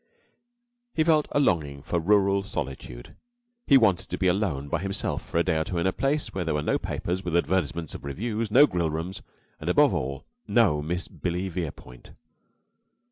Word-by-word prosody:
He 160 - +3
felt 155 -2 +3
a - - +2
longing 75 - +1
for 85 - -1
rural 100 +2 +3
solitude. 65 -9 -6 0.5
He 140 - +8
wanted 105 -8 +2
to - - -3
be 95 - -1
alone 90 -7 +1
by 85 +4 -1
himself 95 0 -2
for - - -4
a 85 - +4
day 80 - +1
or - - +1
two 85 - -4
in 85 - 0
a 95 - +2
place 140 +2 -1
where 95 - -2
there 80 -3 -1
were 75 - -1
no - - +1
papers 90 +2 -3
with 85 -1 0
advertisements 85 -3 -1
of - - -8
revues, 105 - -3
no 145 +7 +7
grill 90 - -1
rooms, 80 +5 -4 0.4
and, - - -4
above - - +5
all, 70 +2 -3 0.2
no 100 -11 +3
Miss 85 +4 -3
Billy 90 +2 -3
Verepoint. 80 -8 -7
90 Hz, 190 wpm, -26 LUFS, 80-100 Hz, 0.5 s, He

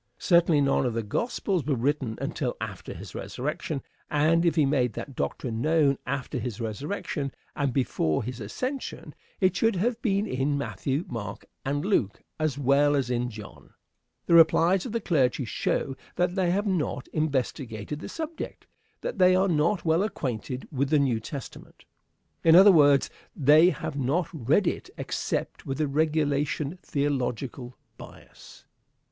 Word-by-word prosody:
Certainly 170 -4 +4
none 135 -2 +2
of 115 - -3
the 115 - -1
gospels 185 - -1
were 140 +1 0
written 130 -2 -1
until - - -3
after - - -6
his - - -9
resurrection; - - -4 0.3
and 160 +3 +3
if 170 - +2
he 155 -4 +4
made 130 -4 +1
that 135 +4 -7
doctrine 115 -2 -3
known 150 -2 +3
after 130 -1 -3
his 115 -2 -5
resurrection, 140 - -3 0.2
and 140 -2 0
before 115 - 0
his 125 +1 -6
ascension, 255 - -5 0.3
it 185 -1 +3
should 225 -2 +2
have 235 +5 0
been 200 -3 +1
in 140 -3 0
Matthew, 140 +2 -2
Mark, 105 -4 -6 0.2
and 145 +3 -1
Luke, 130 - 0 0.2
as 155 -3 0
well 145 +2 +3
as 130 -3 0
in 120 0 0
John. 105 -3 -12 0.5
The - - +1
replies 170 +4 +5
of - - -6
the 230 +1 -1
clergy 135 -7 +1
show 135 +4 -1 0.2
that 180 0 +1
they 185 -2 +1
have 200 +4 +1
not 150 -9 -1
investigated 135 -4 -2
the - - -7
subject; 320 0 -6 0.4
that - - -4
they 185 0 +6
are 190 +1 +3
not 170 +3 +1
well 160 +2 +3
acquainted 130 - -3
with 140 -1 0
the 155 - +4
New 130 -6 +2
Testament. 135 +4 -9 0.6
In 165 0 +7
other 195 +3 +9
words, 145 -5 +5 0.2
they 155 +4 +6
have 150 -4 -4
not 145 +6 +1
read 155 - +2
it - - -2
except - - -3
with 135 -1 -2
the 155 -1 +1
regulation 150 +1 0
theological 130 -3 -2 0.2
bias. - - -14
145 Hz, 155 wpm, -27 LUFS, 130-170 Hz, 0.6 s, other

